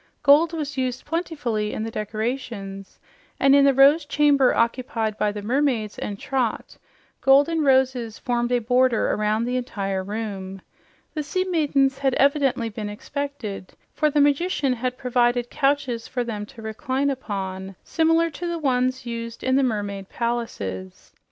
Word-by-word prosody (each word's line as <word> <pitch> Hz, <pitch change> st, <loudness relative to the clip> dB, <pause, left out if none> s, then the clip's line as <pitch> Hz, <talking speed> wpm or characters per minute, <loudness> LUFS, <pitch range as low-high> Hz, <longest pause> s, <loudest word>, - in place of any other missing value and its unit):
Gold 300 Hz, +4 st, +6 dB
was 295 Hz, -4 st, -4 dB
used 255 Hz, -1 st, -2 dB
plentifully 295 Hz, -11 st, -2 dB
in 220 Hz, -, -3 dB
the 225 Hz, -, -4 dB
decorations, 215 Hz, -3 st, -4 dB, 0.4 s
and 275 Hz, 0 st, +5 dB
in 280 Hz, 0 st, +6 dB
the 275 Hz, -, +5 dB
Rose 280 Hz, +4 st, +6 dB
Chamber 290 Hz, -2 st, +3 dB
occupied 230 Hz, -2 st, 0 dB
by 210 Hz, -1 st, 0 dB
the 205 Hz, 0 st, -7 dB
mermaids 240 Hz, -3 st, 0 dB
and 205 Hz, -, -4 dB
Trot 250 Hz, -1 st, -2 dB, 0.5 s
golden 285 Hz, +4 st, +4 dB
roses 260 Hz, -4 st, +2 dB
formed 240 Hz, -2 st, -1 dB
a 245 Hz, -, +4 dB
border 245 Hz, 0 st, +2 dB
around 215 Hz, +2 st, 0 dB
the 250 Hz, +1 st, -1 dB
entire 195 Hz, -6 st, -3 dB
room. 195 Hz, -2 st, -5 dB, 0.5 s
The 305 Hz, -, -2 dB
sea 335 Hz, +6 st, -1 dB
maidens 285 Hz, -7 st, +1 dB
had 270 Hz, -2 st, +1 dB
evidently 275 Hz, -4 st, +2 dB
been 210 Hz, -1 st, -5 dB
expected, 235 Hz, -4 st, -6 dB, 0.2 s
for 305 Hz, -, +2 dB
the 295 Hz, -, +1 dB
magician 285 Hz, -1 st, +2 dB
had 250 Hz, +1 st, -3 dB
provided 245 Hz, -1 st, +1 dB
couches 270 Hz, -4 st, 0 dB
for 245 Hz, -, -2 dB
them 210 Hz, -3 st, -5 dB
to 225 Hz, -, -13 dB
recline 260 Hz, +6 st, -1 dB
upon 195 Hz, -7 st, -5 dB
similar 325 Hz, +1 st, +2 dB
to 345 Hz, +4 st, -5 dB
the 340 Hz, 0 st, -2 dB
ones 255 Hz, -3 st, 0 dB
used 230 Hz, -1 st, -6 dB
in 260 Hz, 0 st, +2 dB
the 275 Hz, -, +4 dB
mermaid 205 Hz, -6 st, -2 dB
palaces. 100 Hz, -, -4 dB
250 Hz, 150 wpm, -23 LUFS, 215-280 Hz, 0.5 s, Gold